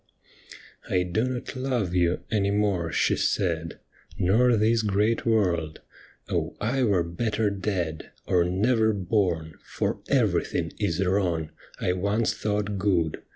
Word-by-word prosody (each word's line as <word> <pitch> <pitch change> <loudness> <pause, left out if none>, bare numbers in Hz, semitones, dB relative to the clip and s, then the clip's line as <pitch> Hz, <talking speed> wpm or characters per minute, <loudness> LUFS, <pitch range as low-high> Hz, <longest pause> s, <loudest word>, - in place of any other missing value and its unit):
' - - -17
I 90 - +2
do 90 +6 0
not 130 +1 -4
love 125 -8 -1
you 90 -1 +1
any 100 -2 +1
more,' 100 -5 0
she - - +2
said, 85 -3 -1 0.2
' - - -24
Nor 120 +4 +4
this 110 +2 +3
great 105 +3 +1
world. 90 -8 +1 0.5
Oh, - - -2
I 125 +6 0
were 100 -8 +3
better 105 +5 -1
dead, 90 -5 -3 0.2
Or 90 -2 +3
never 110 +5 +2
born, 90 -5 -1
for - - -2
everything - - +1
is 85 +4 0
wrong 90 -5 0 0.3
I 90 - +1
once 100 +5 0
thought 105 -1 -2
good. 90 -5 +1
100 Hz, 140 wpm, -26 LUFS, 85-110 Hz, 0.5 s, Nor